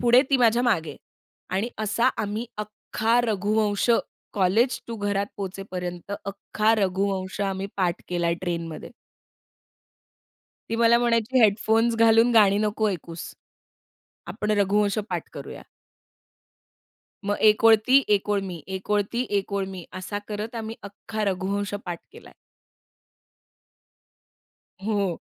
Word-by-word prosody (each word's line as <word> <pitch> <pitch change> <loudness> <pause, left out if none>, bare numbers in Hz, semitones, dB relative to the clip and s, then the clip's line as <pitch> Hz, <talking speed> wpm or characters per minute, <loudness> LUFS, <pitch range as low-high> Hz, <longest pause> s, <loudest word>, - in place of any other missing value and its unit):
पुढे, 245 +1 +6
ती 275 - +5
माझ्या 240 -1 +3
मागे. 195 -10 0 0.5
आणि 195 +5 0
असा 220 +3 +2
आम्ही 215 +3 -3
अख्खा 215 +2 0
रघुवंश, 210 -1 0 0.4
कॉलेज 210 +6 +2
टु 230 - -5
घरात 205 -1 -1
पोहोचेपर्यंत, 185 -1 -6
अख्खा 210 +2 0
रघुवंश 195 -1 -1
आम्ही 195 -1 -1
पाठ 180 -3 0
केलाय 170 -1 0
ट्रेनमध्ये. 170 -3 -4 1.8
ती 230 - 0
मला 235 0 +5
म्हणायची, 235 +1 +2
हेडफोन्स 220 +2 +3
घालून 225 +1 +5
गाणी 205 -3 +5
नको 215 +1 +1
ऐकुस. 170 -2 -7 1.0
आपण 210 +4 -2
रघुवंश 205 +1 +2
पाठ - - -4
करूया. - - -8 1.7
मग, 205 - +1
"1 215 +1 +4
ओळ 225 0 +9
ती, 270 +2 +6
1 200 - -9
ओळ 205 -1 +2
मी, 175 -5 -7
1 190 - -10
ओळ 210 0 +3
ती, 245 +1 -1
1 200 +1 -6
ओळ 200 -1 0
मी," 180 -3 -8 0.2
असा 205 +2 -4
करत 215 +2 -5
आम्ही 220 +1 -5
अख्खा 210 +2 -5
रघुवंश 200 +1 -2
पाठ 175 -2 -4
केलाय. - - -14 2.5
हो. 200 -4 -1
205 Hz, 125 wpm, -25 LUFS, 190-225 Hz, 2.5 s, ओळ